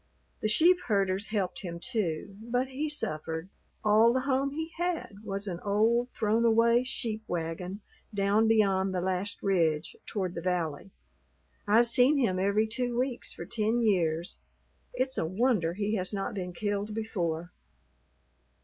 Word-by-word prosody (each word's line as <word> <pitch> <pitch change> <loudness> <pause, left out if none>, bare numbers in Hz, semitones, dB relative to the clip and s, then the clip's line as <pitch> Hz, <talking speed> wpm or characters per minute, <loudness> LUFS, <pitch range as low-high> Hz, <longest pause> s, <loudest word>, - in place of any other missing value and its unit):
The - - +1
sheep 335 +12 +5
herders 195 -2 +1
helped 200 -4 -2
him, 170 -3 -6
too. 195 -3 -2
But 245 +3 -1
he 290 +4 -2
suffered. 160 - -2 0.4
All 215 +2 +6
the 260 - +1
home 270 +1 +1
he 320 +3 -5
had 345 - -2
was 200 -1 -4
an 175 -4 -4
old, 225 +5 +2
thrown 220 +1 +1
away 235 +1 +4
sheep 225 -3 -3
wagon 175 +4 -4 0.3
down 205 +2 +2
beyond 195 -4 +3
the - - +1
last 190 +2 -2
ridge 165 -5 +1
toward 190 -5 -2
the 170 - -5
valley. 175 -2 -2 0.8
I've 225 +4 +5
seen 250 +5 +4
him 200 -9 +1
every 200 +3 +2
two 240 +2 -2
weeks 250 -1 -2
for - - -7
ten 230 +1 0
years. 170 - +1 0.5
It's 255 +1 -1
a - - 0
wonder 185 -3 +1
he 210 +1 -1
has 185 +2 -2
not 195 - -3
been 180 -3 -4
killed 205 +2 -2
before." 175 -6 -2
210 Hz, 150 wpm, -29 LUFS, 185-235 Hz, 0.8 s, All